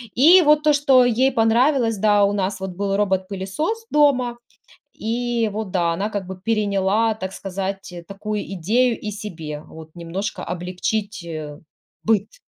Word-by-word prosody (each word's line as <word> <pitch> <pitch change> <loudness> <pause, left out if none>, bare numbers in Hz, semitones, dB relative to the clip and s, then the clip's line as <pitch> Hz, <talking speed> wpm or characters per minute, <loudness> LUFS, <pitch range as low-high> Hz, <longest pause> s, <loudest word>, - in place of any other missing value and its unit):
И 335 +9 +7
вот 300 -2 +4
то, 305 -1 +4
что 275 -3 +5
ей 250 +3 +2
понравилось, 230 +1 +2
да, 205 0 +3
у 200 0 +2
нас 195 -1 -2
вот 190 0 -4
был 195 +1 -1
робот-пылесос 195 - -2
дома, 255 -5 +3 0.6
и 235 0 -1
вот, 210 -2 -5
да, 170 -2 +1
она 200 +5 -2
как 205 -3 -4
бы 190 -1 -8
переняла, 210 +1 +1
так 190 -3 -5
сказать, 195 0 -5
такую 210 +1 -4
идею 225 +7 +1
и 210 - -4
себе 165 -8 -7
вот 160 0 -12
немножко 175 +4 -4
облегчить, 185 +3 -3
э, 155 -3 -7 0.5
быт. 215 -2 +1
205 Hz, 150 wpm, -21 LUFS, 190-240 Hz, 0.6 s, И